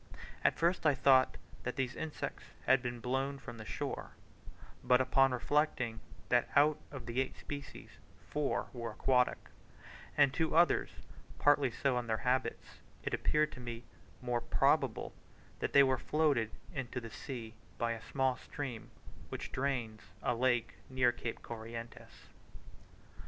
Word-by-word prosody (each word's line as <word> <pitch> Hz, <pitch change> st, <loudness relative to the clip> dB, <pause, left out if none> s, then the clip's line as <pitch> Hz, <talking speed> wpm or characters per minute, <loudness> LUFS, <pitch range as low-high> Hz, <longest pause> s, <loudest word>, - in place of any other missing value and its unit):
At -, -, +3 dB
first 170 Hz, +2 st, +2 dB
I 145 Hz, -, +4 dB
thought 130 Hz, -1 st, +5 dB, 0.2 s
that 125 Hz, -, -3 dB
these 130 Hz, -1 st, -1 dB
insects 160 Hz, -2 st, -5 dB, 0.2 s
had 130 Hz, 0 st, +5 dB
been 120 Hz, -1 st, -4 dB
blown 135 Hz, +3 st, -1 dB
from 120 Hz, -4 st, -9 dB
the 110 Hz, -, -7 dB
shore; -, -, -4 dB, 0.7 s
but 125 Hz, 0 st, +5 dB
upon 130 Hz, +1 st, +4 dB
reflecting 125 Hz, -3 st, 0 dB, 0.3 s
that 120 Hz, -1 st, +3 dB
out 150 Hz, +1 st, +5 dB
of 130 Hz, -5 st, -8 dB
the 120 Hz, +2 st, 0 dB
eight 135 Hz, -, -4 dB
species 140 Hz, -2 st, -8 dB, 0.4 s
four 150 Hz, -1 st, 0 dB
were 120 Hz, -2 st, -4 dB
aquatic, 125 Hz, +3 st, +3 dB, 0.8 s
and 140 Hz, -2 st, +5 dB
two 160 Hz, -1 st, 0 dB
others 170 Hz, +1 st, +4 dB, 0.5 s
partly 145 Hz, -2 st, +4 dB
so 125 Hz, +1 st, 0 dB
in 120 Hz, -, -5 dB
their 110 Hz, -1 st, +1 dB
habits, 130 Hz, +1 st, -1 dB, 0.2 s
it -, -, -3 dB
appeared 155 Hz, 0 st, +2 dB
to -, -, -10 dB
me 120 Hz, -1 st, -6 dB, 0.4 s
most 120 Hz, -1 st, -2 dB
probable -, -, +2 dB, 0.5 s
that -, -, -1 dB
they 140 Hz, -, +8 dB
were 130 Hz, -2 st, +2 dB
floated 145 Hz, -8 st, +2 dB, 0.2 s
into 130 Hz, -3 st, -3 dB
the 115 Hz, -2 st, -9 dB
sea 115 Hz, -5 st, -6 dB, 0.2 s
by 115 Hz, 0 st, 0 dB
a 115 Hz, -1 st, -4 dB
small 130 Hz, +1 st, 0 dB
stream 130 Hz, -6 st, -6 dB, 0.4 s
which -, -, -5 dB
drains 125 Hz, -5 st, -2 dB, 0.2 s
a 125 Hz, -, +2 dB
lake 120 Hz, -2 st, +1 dB
near 130 Hz, -2 st, +3 dB
Cape 120 Hz, -1 st, -5 dB
Corrientes. 115 Hz, 0 st, -8 dB
130 Hz, 145 wpm, -34 LUFS, 120-140 Hz, 0.8 s, they